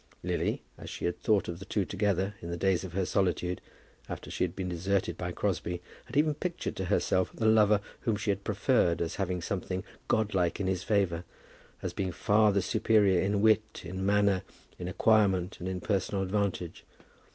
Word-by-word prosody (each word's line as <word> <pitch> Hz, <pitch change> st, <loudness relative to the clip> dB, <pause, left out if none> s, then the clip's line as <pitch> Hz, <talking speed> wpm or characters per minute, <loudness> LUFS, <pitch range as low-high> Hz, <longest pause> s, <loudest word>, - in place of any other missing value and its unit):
Lily, -, -, -1 dB, 0.2 s
as -, -, -8 dB
she -, -, -5 dB
had 85 Hz, 0 st, -1 dB
thought 105 Hz, -4 st, +2 dB
of 85 Hz, 0 st, -5 dB
the 100 Hz, -, -8 dB
two 100 Hz, -2 st, 0 dB
together, 100 Hz, 0 st, 0 dB
in 85 Hz, -, -6 dB
the 85 Hz, -, -3 dB
days 95 Hz, +1 st, +2 dB
of 90 Hz, -3 st, -7 dB
her 95 Hz, 0 st, 0 dB
solitude, 90 Hz, -2 st, 0 dB, 0.5 s
after -, -, -6 dB
she -, -, 0 dB
had 90 Hz, -2 st, -2 dB
been 95 Hz, -1 st, -3 dB
deserted 90 Hz, +2 st, 0 dB
by 90 Hz, 0 st, -4 dB
Crosbie, 90 Hz, -2 st, -2 dB, 0.3 s
had 130 Hz, +2 st, -5 dB
ever 150 Hz, +1 st, +4 dB
pictured 175 Hz, +4 st, -3 dB
to 95 Hz, -, -2 dB
herself 95 Hz, +1 st, +1 dB
the 110 Hz, -, -2 dB
lover 105 Hz, -1 st, +5 dB, 0.2 s
whom 115 Hz, -, 0 dB
she 105 Hz, 0 st, 0 dB
had 100 Hz, 0 st, -3 dB
preferred 100 Hz, -4 st, +2 dB
as 85 Hz, -, -2 dB
having 90 Hz, -3 st, -1 dB
something 95 Hz, 0 st, -3 dB, 0.2 s
godlike 100 Hz, -5 st, +1 dB
in 100 Hz, -, -1 dB
his 95 Hz, -1 st, 0 dB
favour, 95 Hz, -5 st, +1 dB, 0.6 s
as -, -, -3 dB
being 95 Hz, -2 st, -2 dB
far 105 Hz, +4 st, +3 dB
the 100 Hz, -2 st, +1 dB
superior 100 Hz, -3 st, +3 dB
in 100 Hz, +1 st, +1 dB
wit, 110 Hz, 0 st, +2 dB
in 95 Hz, +2 st, -4 dB
manner, 100 Hz, -1 st, +3 dB, 0.4 s
in 90 Hz, -, -4 dB
acquirement, 95 Hz, -2 st, +2 dB
and 90 Hz, -, -3 dB
in 95 Hz, -1 st, -3 dB
personal 95 Hz, 0 st, 0 dB
advantage. 95 Hz, -3 st, -2 dB
95 Hz, 190 wpm, -30 LUFS, 90-105 Hz, 0.6 s, lover